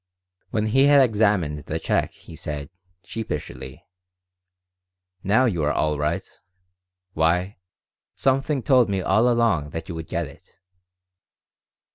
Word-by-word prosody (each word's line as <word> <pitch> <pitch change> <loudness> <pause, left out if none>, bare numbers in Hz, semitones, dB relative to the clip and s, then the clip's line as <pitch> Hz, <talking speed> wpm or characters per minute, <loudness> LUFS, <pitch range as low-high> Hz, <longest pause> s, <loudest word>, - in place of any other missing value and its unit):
When 110 -3 -1
he 135 +6 +4
had 145 0 +6
examined 100 - +1
the 75 - -4
check - - 0
he - - -14
said, 75 0 -6 0.3
sheepishly: 75 -10 -6 1.4
"Now 110 +7 +3
you 90 -10 0
are 75 - +2
all 75 -1 0
right. 75 +1 -1 0.9
Why, 90 +4 +1 0.6
something 135 0 +1
told 125 -5 +4
me 95 -2 -1
all 110 +7 +3
along 115 -11 +1
that 80 +3 -7
you - - -4
would 80 -1 -6
get 85 0 -2
it." 70 +6 -15
95 Hz, 125 wpm, -23 LUFS, 75-115 Hz, 1.4 s, had